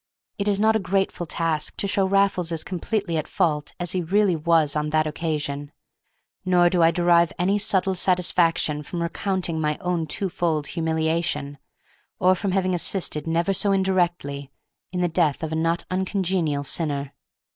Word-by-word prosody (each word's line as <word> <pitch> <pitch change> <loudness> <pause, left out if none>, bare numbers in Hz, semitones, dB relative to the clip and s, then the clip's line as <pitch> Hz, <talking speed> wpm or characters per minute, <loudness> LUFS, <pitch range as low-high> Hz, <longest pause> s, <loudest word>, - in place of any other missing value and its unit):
It 200 - -1
is 200 -1 +2
not 220 +1 +3
a - - +2
grateful 190 -2 -1
task 160 -2 0
to - - 0
show 195 0 +1
Raffles 195 -3 +1
as 165 -1 -2
completely 190 -1 -2
at 155 - -3
fault 150 -3 -1
as 175 -1 +1
he 185 - -1
really 190 +2 +2
was 160 -2 +2
on 150 0 -1
that 155 0 +2
occasion; 150 -2 -3 0.7
nor 175 -2 +3
do 180 - +2
I 165 - +6
derive 170 0 +3
any 195 +4 +1
subtle 190 -1 +2
satisfaction 175 -4 +1
from 170 +3 -4
recounting 175 -2 -2
my 150 -1 0
own 175 -3 -2
twofold 170 -4 -1
humiliation, 160 -3 -2 0.6
or 185 +1 +4
from 195 +2 -2
having 185 -1 0
assisted 170 -3 0
never 170 +4 +1
so 200 +1 +2
indirectly 175 -8 0 0.4
in 180 -1 -2
the 175 - +2
death 160 -3 0
of 160 - -3
a - - -2
not 165 +1 0
uncongenial 185 -5 -1
sinner. 140 -2 -2
170 Hz, 165 wpm, -23 LUFS, 155-185 Hz, 0.7 s, I